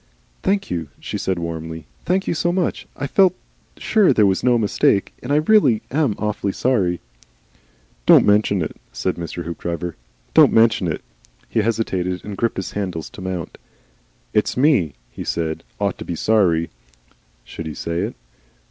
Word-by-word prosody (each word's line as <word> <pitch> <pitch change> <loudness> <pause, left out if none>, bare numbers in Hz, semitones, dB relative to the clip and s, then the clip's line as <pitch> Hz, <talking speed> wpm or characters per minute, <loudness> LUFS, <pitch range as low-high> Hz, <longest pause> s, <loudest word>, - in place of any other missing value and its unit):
"Thank 195 +1 0
you," 85 -3 -2
she - - -4
said 95 -1 -1
warmly. 80 -1 -5 0.2
"Thank 190 +2 +1
you - - 0
so 175 +1 +1
much. 180 -1 -1
I 140 - -2
felt 185 +5 +4 0.4
sure 215 -7 +3
there 110 -3 +4
was 95 -1 +1
no 125 -1 +4
mistake. 100 -2 +2
And 125 - -5
I - - +4
really 150 - +4
am 140 -6 +1
awfully 105 -2 -2
sorry 95 -9 +1 0.5
" - - -35
"Don't - - +8
mention 105 -3 +3
it," - - -6
said 95 - -1
Mr. 85 0 -5
Hoopdriver. 85 0 -4 0.4
"Don't - - +7
mention 110 -5 +4
it." 80 - -3 0.5
He - - 0
hesitated 95 -5 -1
and 105 - -5
gripped 115 +3 -1
his 95 - -3
handles 90 -5 -4
to - - -10
mount. 90 -3 -5 0.7
"It's - - +1
me," 125 - +3 0.2
he - - -7
said, 80 -2 -2 0.2
"ought - - -1
to - - -5
be 85 - -3
sorry." 85 -5 +2 0.7
Should 80 - -7
he 75 - -6
say 85 0 -3
it? 105 +6 -2
100 Hz, 165 wpm, -21 LUFS, 85-125 Hz, 0.7 s, Don't